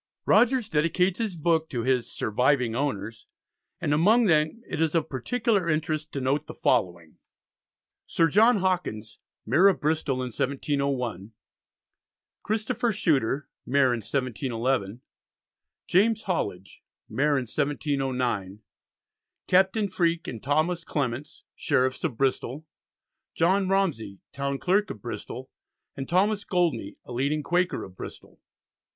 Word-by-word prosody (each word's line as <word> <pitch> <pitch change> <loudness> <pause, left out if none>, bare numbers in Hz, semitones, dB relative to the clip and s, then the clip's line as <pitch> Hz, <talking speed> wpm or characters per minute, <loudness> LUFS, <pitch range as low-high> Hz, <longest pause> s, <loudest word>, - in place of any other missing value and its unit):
Rogers 245 -2 +4
dedicates 170 +5 +1
his 215 -5 -2
book 160 0 +1
to 120 -4 -3
his 125 -1 0
"surviving 125 +1 +1
owners," 115 -5 -3 0.5
and 145 - 0
among 215 +10 +4
them 160 +5 +2
it 155 - -3
is 160 0 +1
of 165 - +1
particular 200 - 0
interest 155 0 -1
to 140 - -2
note 135 +3 0
the - - -8
following: 85 -3 0 0.9
Sir 165 - +3
John 220 +8 +5
Hawkins, 175 - -2 0.3
Mayor 155 - +5
of 195 - +3
Bristol 150 -2 0
in 125 - -3
1701; 130 -6 -2 1.1
Christopher 225 +2 -1
Shuter, 145 - 0 0.2
Mayor 130 -1 +3
in 120 - -2
1711; 120 -2 -2 0.8
James 220 +4 +2
Hollidge, 100 - -3 0.3
Mayor 145 +1 +1
in 130 - 0
1709; 130 -7 -2 0.8
Captain 190 +3 +3
Freake 170 -3 0
and 115 -4 -6
Thomas 160 +5 0
Clements, 140 -1 -3
Sheriffs 130 +1 0
of 145 -9 -2
Bristol; 135 +2 -1 0.7
John 190 +4 +2
Romsey, 155 - 0
Town 140 0 -2
Clerk 195 +7 +1
of - - -6
Bristol, 120 +3 -7 0.4
and 135 -1 -6
Thomas 205 +4 +2
Goldney, 165 - 0
a - - -11
leading 140 +5 -1
Quaker 175 +4 0
of 95 - -11
Bristol. - - -10
145 Hz, 125 wpm, -26 LUFS, 125-180 Hz, 1.1 s, John